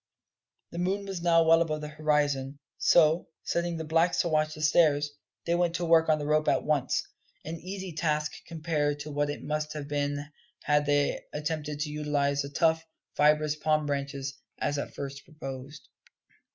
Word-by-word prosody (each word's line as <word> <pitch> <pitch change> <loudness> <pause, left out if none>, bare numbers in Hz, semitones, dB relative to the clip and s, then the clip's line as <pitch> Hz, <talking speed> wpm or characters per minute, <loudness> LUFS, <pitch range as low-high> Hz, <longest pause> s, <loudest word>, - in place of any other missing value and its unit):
The 170 - -5
moon 195 +3 -1
was 190 -3 -5
now 165 -1 +5
well 165 +1 +5
above 155 -2 -1
the 150 - -5
horizon; 150 -3 0 0.2
so, 160 0 +4 0.2
setting 170 0 -1
the 160 - -4
blacks 165 +2 +2
to 170 - -1
watch 155 0 +1
the 155 - -8
stairs, 150 -2 +4 0.3
they 170 - +1
went 175 -1 +1
to 175 - -1
work 165 -1 +4
on 155 - +4
the 145 - -4
rope 155 +1 +2
at - - +2
once 145 -4 +1 0.4
an 165 +2 -4
easy 190 0 -6
task 150 -1 0 0.2
compared 155 -3 -1
to 150 +1 -6
what 145 0 0
it 145 - -5
must 150 0 -2
have 150 -2 -5
been 145 0 -1 0.4
had 150 0 +2
they 145 0 +2
attempted 150 -1 -3
to 150 -1 -2
utilise 145 -1 0
the 140 - -5
tough, 160 +2 +2 0.3
fibrous 150 +1 +3
palm 155 0 +1
branches, 140 -1 -3 0.2
as 145 0 -1
at - - -6
first 140 -1 -6
proposed. 135 -2 -9
150 Hz, 180 wpm, -28 LUFS, 145-165 Hz, 0.4 s, now